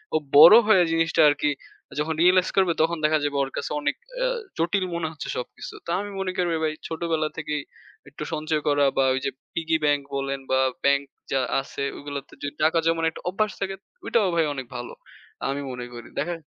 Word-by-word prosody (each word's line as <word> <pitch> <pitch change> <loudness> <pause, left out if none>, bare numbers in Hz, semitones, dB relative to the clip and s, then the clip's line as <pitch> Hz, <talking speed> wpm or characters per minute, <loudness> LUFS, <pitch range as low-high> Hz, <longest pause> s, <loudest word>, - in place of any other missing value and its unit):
ও - - +6 0.2
বড় 165 +8 +11
হয়ে 190 -5 +6
জিনিসটা 165 0 +2
আর 145 - +2
কি 150 - +3 0.5
যখন 160 +2 0
রিয়ালাইজ 185 +1 +5
করবে 190 -3 +4
তখন 170 +1 +2
দেখা 155 0 +4
যাবে 145 -1 -1
ওর 135 - -5
কাছে - - -3
অনেক 145 0 0 0.2
অ্যা - - +1 0.3
জটিল 185 +3 +1
মনে 165 -1 -1
হচ্ছে 150 - -7
সবকিছু। 125 - -7
তা - - -3
আমি 205 0 -6
মনে 190 -1 -1
করি 175 -1 +1
ভাই 155 -1 +1
ছোটবেলা 160 -1 -1
থেকেই 150 -2 -2 0.5
একটু 145 - -7
সঞ্চয় 155 0 -1
করা 145 -1 +4
বা 135 - +4
ওই 130 - 0
যে 135 - 0 0.2
পিগি 160 -1 0
ব্যাংক 145 -1 +3
বলেন 135 0 -2
বা 130 - +4 0.3
ব্যাংক 140 0 +4 0.3
যা 135 - +2 0.2
আছে 140 0 -6
ওগুলোতে 145 -1 -7
যদি 145 - -4
টাকা 160 +2 +3
জমানোর 165 0 +2
একটা - - -11
অভ্যাস 210 +3 0
থাকে। 195 -1 -2 0.3
ঐটাও 215 -5 +2
ভাই 165 -2 +3
অনেক 130 -2 -5
ভালো। 120 0 -6 0.5
আমি 140 +1 -2
মনে 125 -1 -6
করি। 120 -1 -9
দেখে 170 -2 -3
155 Hz, 200 wpm, -25 LUFS, 145-170 Hz, 0.5 s, বড়